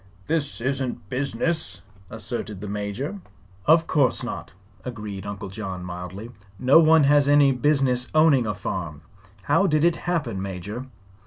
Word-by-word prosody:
"This 150 -6 -2
isn't 130 -4 -3
business," 140 +6 -2 0.3
asserted 110 -2 -5
the 105 - -6
Major. 105 - -4 0.5
"Of 160 +1 +6
course 140 -6 +1
not," - - -6 0.3
agreed 105 -5 -6
Uncle 100 0 -6
John, 95 -3 -6
mildly. 90 +5 -7 0.3
"No 130 +7 +6
one 160 -1 +6
has 145 0 +4
any 145 -1 +6
business 130 -1 +1
owning 150 -7 +5
a 105 - -2
farm. 80 -5 -5 0.4
How 195 - +3
did 155 -2 +2
it 170 -1 +3
happen. 140 - -1
Major?" 100 +6 -6
125 Hz, 140 wpm, -24 LUFS, 100-145 Hz, 0.5 s, Of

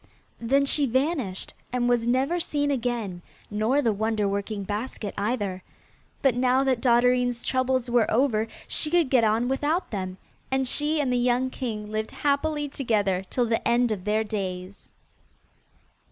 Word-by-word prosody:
Then 275 +4 +2
she 280 0 +3
vanished, 260 - -1 0.2
and 245 -1 0
was 240 -1 +2
never 270 +8 +1
seen 290 -4 0
again, 235 -8 -2 0.3
nor 225 +8 +1
the 225 -3 +2
wonder 215 0 0
working 200 +1 -3
basket 210 +1 -4
either; 205 -3 -2 0.6
but 270 -3 +4
now 255 +2 +2
that 260 -3 +1
Dotterine's 245 0 +2
troubles 260 -1 0
were 240 -2 +2
over 225 -3 +2 0.2
she 305 - +1
could 335 -4 +2
get 250 -4 +4
on 220 +2 +2
without 295 +7 -1
them, 185 -3 -4 0.3
and 265 0 0
she 300 +4 +1
and 265 -4 +1
the - - +2
young 250 +1 +1
king 215 -6 -5
lived 215 0 -2
happily 295 +1 0
together 210 -9 0
till 245 - +1
the 225 -1 -1
end 240 0 +3
of 195 -4 -3
their 215 +1 +1
days. 190 -2 -5
245 Hz, 155 wpm, -26 LUFS, 215-265 Hz, 0.6 s, but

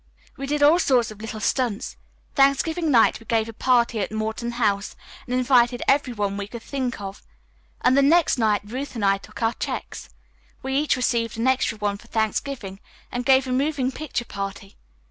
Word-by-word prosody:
We 275 -1 -6
did 295 +1 0
all 310 +4 +6
sorts 250 -9 +2
of 215 0 -12
little 220 0 -6
stunts. 235 -2 -1 0.4
Thanksgiving 305 +4 +2
night 235 -5 +4
we 225 - -17
gave 225 -1 +1
a 230 - -8
party 235 -1 +2
at 195 - -2
Morton 220 +2 -3
House 205 -4 0 0.3
and 250 - -1
invited 245 -1 +3
every 275 -2 +3
one 205 -3 -2
we 200 -1 -4
could 235 +1 -9
think 260 -5 -3
of, 195 0 -7 0.6
and 255 - +4
the 280 - +5
next 315 -1 +4
night 215 -2 +2
Ruth 255 +6 -6
and 215 -3 -1
I 195 0 +3
took 215 - -9
our 225 +1 +2
checks, - - -5 0.5
we 265 0 -2
each 295 +2 +2
received 235 -2 -1
an 230 - -1
extra 260 -4 +1
one 205 -1 -2
for - - -17
Thanksgiving, 220 -2 -2 0.3
and 245 +1 -3
gave 265 0 +5
a 255 - -4
moving 270 0 0
picture 270 -4 -4
party. 195 -1 -6
240 Hz, 190 wpm, -23 LUFS, 215-270 Hz, 0.6 s, all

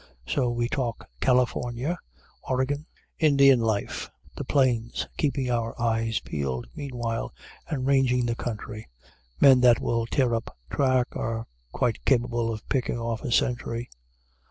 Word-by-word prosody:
So 125 - +1
we 120 0 0
talk 120 -3 -3
California, 125 +4 +1 0.4
Oregon, 135 +4 -1 0.3
Indian 140 -4 +6
life, 110 -3 -1 0.3
the - - -4
Plains, 120 -4 +1
keeping 135 -4 0
our 115 -1 -2
eyes 115 -1 +1
peeled 65 -5 -3
meanwhile, 120 -5 -4 0.3
and 135 -4 -2
ranging 130 -2 +3
the 120 - 0
country. 110 -2 -5 0.5
Men 130 -2 +7
that 120 -2 +6
will 115 -1 0
tear 125 -1 +2
up 115 0 -3
track 130 -2 +2
are 115 0 -2 0.3
quite 120 - -1
capable 120 -3 +1
of 110 -1 -7
picking 125 -3 0
off 115 -1 -3
a - - -4
sentry. 120 -2 0
120 Hz, 130 wpm, -26 LUFS, 115-130 Hz, 0.5 s, Men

